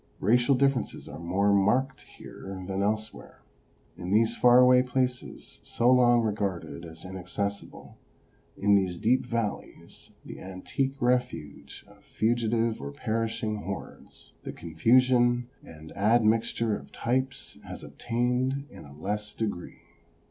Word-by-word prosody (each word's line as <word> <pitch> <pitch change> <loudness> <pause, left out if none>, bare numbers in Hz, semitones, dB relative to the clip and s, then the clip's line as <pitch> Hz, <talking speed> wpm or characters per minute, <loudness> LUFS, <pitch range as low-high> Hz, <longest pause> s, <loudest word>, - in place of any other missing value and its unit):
Racial 120 +6 +3
differences 135 -1 0
are - - -8
more 95 +4 +1
marked 125 +7 +2
here 95 -1 -10
than 95 0 -2
elsewhere. 110 +1 -3 0.5
In 90 0 -7
these 110 +3 +3
far 125 0 +6
away 125 0 +7
places, 125 0 -3
so 120 +2 +2
long 120 -2 +5
regarded 95 -6 -3
as 80 +1 -11
inaccessible, 95 +2 -5 0.6
in 100 +1 +3
these 95 -3 +2
deep 120 +7 +2
valleys, 115 -4 -5 0.2
the - - -9
antique 130 +9 -3
refuge 125 - -2
of - - -20
fugitive 115 0 0
or 70 - -5
perishing 110 +4 -2
hordes, 100 -1 -8
the - - -6
confusion 120 +7 +2
and 80 0 -13
admixture 110 +1 +2
of - - -10
types 130 +3 -2
has - - -9
obtained 125 +3 -1
in - - -12
a 70 0 -14
less 105 +5 -4
degree. 105 -6 -4
110 Hz, 125 wpm, -28 LUFS, 95-125 Hz, 0.6 s, away